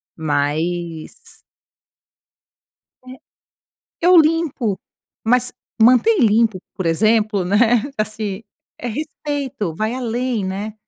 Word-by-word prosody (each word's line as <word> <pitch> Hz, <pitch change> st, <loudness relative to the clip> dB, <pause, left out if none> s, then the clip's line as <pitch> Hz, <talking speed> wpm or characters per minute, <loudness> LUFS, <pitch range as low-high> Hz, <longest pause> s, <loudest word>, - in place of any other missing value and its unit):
Mas 160 Hz, +2 st, -3 dB, 1.7 s
é, 255 Hz, +1 st, -11 dB, 0.8 s
eu 355 Hz, +1 st, +5 dB
limpo. 310 Hz, -, +2 dB, 0.5 s
Mas 250 Hz, +2 st, +2 dB, 0.3 s
manter 255 Hz, -, +5 dB
limpo, 220 Hz, -2 st, +3 dB, 0.2 s
por 185 Hz, -, -4 dB
exemplo, 215 Hz, +3 st, +2 dB
né, 225 Hz, +4 st, +3 dB, 0.2 s
assim, 215 Hz, -1 st, -3 dB, 0.4 s
é 245 Hz, -, -5 dB
respeito. 280 Hz, -, -4 dB
Vai 215 Hz, +6 st, -2 dB
além, 240 Hz, -3 st, -2 dB
né. 200 Hz, +3 st, -4 dB
220 Hz, 90 wpm, -19 LUFS, 190-250 Hz, 1.7 s, eu